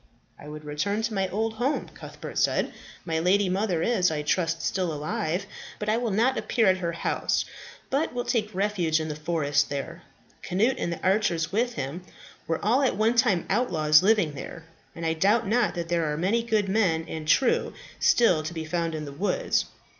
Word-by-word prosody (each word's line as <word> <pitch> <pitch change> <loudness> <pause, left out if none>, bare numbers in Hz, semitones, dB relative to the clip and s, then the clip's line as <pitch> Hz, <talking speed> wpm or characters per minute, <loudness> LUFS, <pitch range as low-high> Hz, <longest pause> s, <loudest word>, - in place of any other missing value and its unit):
"I 145 - -11
would 150 0 -9
return 200 +9 -1
to 225 0 -1
my 195 -2 0
old 220 +3 -1
home," 245 +6 -1
Cuthbert - - -7
said. - - +1 0.3
"My 160 -2 -1
lady 190 +3 +3
mother 185 -3 0
is, 200 -7 +2
I 150 -2 -2
trust, 165 +1 0
still 185 -3 0
alive. 155 +4 -2 0.3
But 210 - -3
I 220 - +2
will 240 -1 -1
not 230 +6 +2
appear 230 -3 +1
at 185 -1 +3
her 170 -2 -2
house, 170 - -1 0.5
but 280 +4 +1
will 245 0 -3
take 215 -4 -1
refuge 185 -5 +1
in 155 0 -3
the 150 - -4
forest 150 -2 0
there. 145 +5 -5 0.4
Cnut, 220 +9 +1
and 170 - -1
the 170 - -6
archers 185 -4 +1
with 240 +4 0
him, 150 -2 -4 0.5
were 165 - -1
all 240 +6 +3
at 265 - +2
one 220 +2 +3
time 230 -8 +2
outlaws 155 -9 +3
living 205 -5 +3
there, 165 +3 -8 0.3
and 165 - -5
I 160 - +2
doubt 205 +8 +2
not 230 +1 +1
that 170 -1 -4
there 165 -3 +1
are 150 - -2
many 195 +8 +1
good 220 -3 0
men 185 -6 +1
and 155 -1 -6
true 265 - +2 0.3
still 185 -10 +4
to 155 +2 -5
be 160 -1 -4
found 165 0 -2
in 155 -1 -4
the 140 - -7
woods. 205 - 0
185 Hz, 200 wpm, -26 LUFS, 160-220 Hz, 0.5 s, still